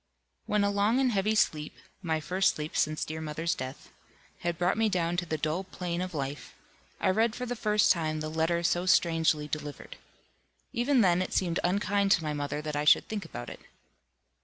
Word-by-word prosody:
When 210 -1 +2
a 200 - +2
long 205 +5 +2
and 260 -2 +2
heavy 210 +1 +1
sleep 150 -7 +1 0.3
(my 160 -4 -1
first 180 +6 +1
sleep 150 +1 -6
since 155 0 +1
dear 160 0 -5
mother's 160 +3 -2
death) 130 -5 -7 0.5
had 170 -1 -2
brought 180 +2 +1
me 220 0 +2
down 175 -3 0
to 175 0 -2
the 155 - -1
dull 155 +5 -1
plain 180 -2 -4
of 185 -2 -4
life, 140 0 -5 0.4
I - - +2
read 220 +3 +1
for 250 - -4
the 245 0 -3
first 210 -2 +3
time 155 -3 0
the 155 - -3
letter 160 +2 0
so 175 +2 +1
strangely 165 -4 +3
delivered. 150 -1 -6 0.8
Even 250 +1 +3
then 180 -3 +3
it 185 - -3
seemed 175 -3 +1
unkind 200 +2 +1
to 170 - +1
my 150 -1 -2
mother 145 +1 -3
that 150 -1 -4
I 145 - 0
should 150 - +5
think 205 -4 -4
about 120 -7 -7
it. - - -10
175 Hz, 200 wpm, -29 LUFS, 155-200 Hz, 0.8 s, should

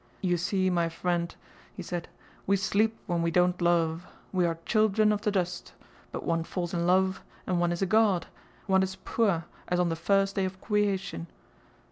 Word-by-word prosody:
"You 180 -2 +2
see, 185 +2 0
my 170 -1 +2
fwiend," 170 0 -2 0.4
he 185 - -6
said, 175 0 -4 0.4
"we 200 +1 +4
sleep 215 +3 +1
when 175 -3 0
we 170 - +1
don't 180 +1 +2
love. 170 0 +1 0.2
We 180 -2 +2
are 165 -1 -2
childwen 215 -1 +3
of 205 - -2
the 215 - +1
dust... 180 -3 -2 0.4
but - - -5
one 165 -1 0
falls 175 0 -4
in 170 0 0
love 190 +1 +2 0.2
and 180 -1 0
one 175 0 +2
is 175 +2 -1
a - - +3
God, 205 -3 +3 0.4
one 190 -1 +3
is 190 0 -1
pua' 195 -8 +1 0.2
as 180 - 0
on 175 -1 +2
the 165 - -1
fihst 195 +4 +2
day 195 -1 0
of 185 0 -5
cweation... 195 - -1
180 Hz, 190 wpm, -28 LUFS, 170-195 Hz, 0.4 s, we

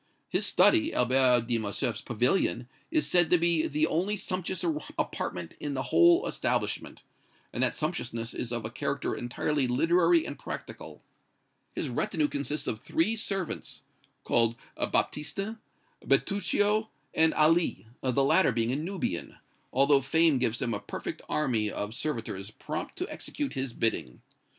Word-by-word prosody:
His - - +1
study, 325 -2 +4
Albert 125 -1 +4
de 120 -1 0
Morcerf's 110 +3 -2
pavilion, 120 - 0 0.2
is 315 -2 +1
said 175 -2 +3
to 180 - +5
be 170 -1 +2
the 150 +1 +1
only 185 +7 0
sumptuous 185 -1 -2 0.3
apartment 90 -2 -3
in 145 -2 -3
the 130 - -1
whole 345 0 +6
establishment; - - -2 0.5
and - - -2
that - - +1
sumptuousness 120 -8 -3
is 120 - -4
of 120 -2 -3
a 110 - -5
character - - -2
entirely 130 +3 -1
literary 165 +6 +3
and 145 - -6
practical. - - -8 0.7
His - - -2
retinue 155 - 0
consists 145 +2 -3
of 110 - -2
three 185 - 0
servants, 195 -5 -4 0.4
called 115 -1 +3 0.2
Baptistin, 195 +9 -1 0.4
Bertuccio 205 +2 +2 0.2
and 160 0 +4
Ali, 160 -3 +3 0.2
the 130 +1 +2
latter 140 +2 +4
being 115 0 0
a - - 0
Nubian, 160 - -3 0.4
although 140 +1 +4
fame 160 +1 +3
gives 120 0 0
him 120 -2 -1
a 100 - -2
perfect - - -6
army 120 -8 +1
of 105 +1 -4
servitors 115 -8 -4
prompt 155 +7 -6
to 365 - -3
execute 290 -2 -4
his 135 -2 -3
bidding. 110 - -1
145 Hz, 145 wpm, -29 LUFS, 120-175 Hz, 0.7 s, whole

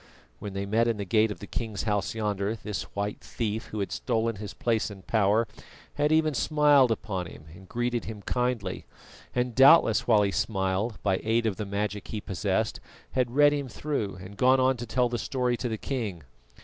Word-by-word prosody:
When 100 - -6
they 100 0 -3
met 115 +4 +2
in 115 -2 0
the 100 - -4
gate 110 +4 +3
of 105 - -5
the - - -9
king's 110 -1 -4
house 105 -1 -1
yonder 105 -1 -1
this 105 -2 -4
white 100 +1 -2
thief, 110 -1 -3
who 105 - -4
had 95 -3 -3
stolen 115 -2 -1
his 105 -1 -6
place 115 0 0
and 95 -2 -11
power, 110 +1 +2 0.5
had 150 +1 +1
even 155 -1 +3
smiled 145 +1 +4
upon 95 -5 -2
him 75 - -12
and 95 +1 -14
greeted 120 -1 -1
him 105 -2 -7
kindly, 125 +1 -2 0.5
and 125 0 0
doubtless 135 +7 +6
while 110 -3 +5
he 100 - +1
smiled, 95 +2 -1
by 95 -2 +1
aid 115 +1 +1
of 105 -4 0
the 105 -2 -4
magic 105 0 -3
he 110 - -4
possessed, 100 +2 -1 0.3
had 125 -1 0
read 145 0 +6
him 140 -2 -2
through 120 -6 -3
and 95 +2 -11
gone 130 +1 +5
on 130 +1 +3
to 120 0 -6
tell 125 +2 +2
the 120 -1 -3
story 125 -2 0
to 125 - -3
the 110 - -2
king. 105 - -4
110 Hz, 200 wpm, -27 LUFS, 100-125 Hz, 0.5 s, doubtless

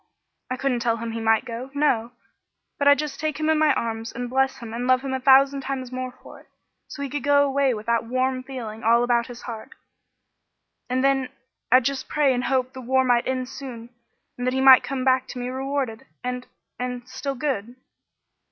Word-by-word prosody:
I 255 - -2
couldn't 260 -2 0
tell 230 -1 0
him 230 0 -5
he 230 - -4
might 225 -1 +2
go, 240 +3 -6
no, 245 -5 +1 0.7
but 285 - +2
I'd 285 0 +7
just 300 -2 -4
take 310 -1 -2
him 310 0 +2
in 310 - +2
my 310 -1 +4
arms 225 0 -3
and 245 0 -5
bless 265 +1 +1
him 230 -2 -8
and 245 +2 -3
love 255 0 +4
him 270 -1 -4
a 265 - -1
thousand 275 +1 +5
times 260 -2 -4
more 255 0 -4
for - - -12
it, - - -21 0.4
so 280 - -7
he - - -2
could 290 - -2
go 285 +1 +4
away 275 -2 +1
with 215 0 -8
that 230 0 +1
warm 255 +2 0
feeling 240 -5 -7
all 235 +2 +4
about 240 -1 +1
his 245 -1 -10
heart; 225 -3 -8 1.2
and 255 +1 0
then 270 -1 +2 0.4
I'd 255 0 +6
just 270 -1 -2
pray 290 -3 +3
and 245 0 -1
hope 260 -1 0
the 260 - -8
war 260 +2 +2
might 245 -2 +2
end 255 -1 -1
soon 250 -3 -9 0.5
and 245 - -2
that 255 - 0
he - - +1
might 265 -1 +8
come 260 +1 -3
back 260 0 +3
to - - -8
me 245 0 -3
rewarded, 265 -2 -3 0.2
and 250 0 -4 0.3
and 250 0 -4
still 260 +2 -4
good." 250 -4 -3
255 Hz, 215 wpm, -24 LUFS, 240-270 Hz, 1.2 s, might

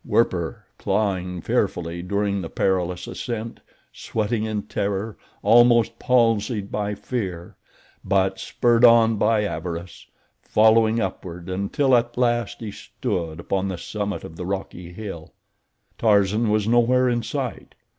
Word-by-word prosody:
Werper, - - 0
clawing 90 -4 -1
fearfully 85 +1 -1
during 100 +1 -1
the 85 - -6
perilous 90 -2 -1
ascent, 115 -2 -5 0.3
sweating 110 0 -2
in 105 -2 -2
terror, 100 +2 -3 0.3
almost 120 -1 +5
palsied 115 -4 +1
by 105 0 -2
fear, 95 -7 -5 0.5
but 95 -1 +1
spurred 120 -1 +1
on 115 -2 +6
by 110 0 +2
avarice, 85 -1 -5 0.3
following 110 +1 +4
upward, 90 -3 -5
until 100 +8 +1
at 120 0 0
last 120 -2 0
he 110 -2 -5
stood 80 -4 -4
upon 95 +2 -1
the 95 -2 -4
summit 105 +3 -4
of 80 - -10
the 90 - -5
rocky 95 -2 -5
hill. 90 -4 -8 0.7
Tarzan 105 +1 +3
was 105 0 +1
nowhere 120 +2 +3
in 120 -1 +1
sight. 125 -1 -5
105 Hz, 125 wpm, -23 LUFS, 95-115 Hz, 0.7 s, on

